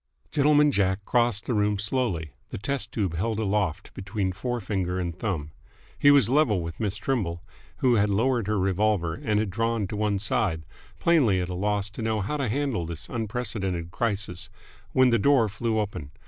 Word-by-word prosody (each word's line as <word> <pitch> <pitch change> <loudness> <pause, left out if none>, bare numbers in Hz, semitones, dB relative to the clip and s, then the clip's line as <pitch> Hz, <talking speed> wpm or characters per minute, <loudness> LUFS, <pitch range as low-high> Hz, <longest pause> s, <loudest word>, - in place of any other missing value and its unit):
Gentleman 150 0 +4
Jack 95 -3 0
crossed 120 -4 +1
the 125 - -1
room 105 -1 +2
slowly, 105 - -1 0.2
the - - -5
test 140 +6 -3
tube 95 -7 -1
held 110 +6 -1
aloft 105 -5 -1
between 95 0 -2
fore 120 +6 -3
finger 95 -3 -2
and 85 -2 -3
thumb. 85 -8 -3 0.5
He 145 - +6
was 140 -2 +6
level 130 -6 +3
with 85 0 -7
Miss 105 -3 -1
Trimble, 100 -7 -2 0.3
who 125 -3 +3
had 105 0 +3
lowered 115 +2 +1
her 105 0 +1
revolver 95 -2 +1
and 105 +5 0
had 105 -3 -1
drawn 115 +1 0
to - - -4
one 105 -1 0
side, 95 -5 -1 0.3
plainly 135 - +3
at 90 0 -2
a - - -3
loss 100 +2 0
to 105 - -7
know 110 -1 0
how 130 +10 -2
to 135 -5 -1
handle 125 - -1
this 85 -1 -7
unprecedented 105 -7 -3
crisis, 105 -4 -2 0.4
when 130 0 +4
the 115 - +3
door 130 -1 +4
flew 110 +3 -2
open. 100 -9 -3
105 Hz, 185 wpm, -26 LUFS, 95-120 Hz, 0.5 s, He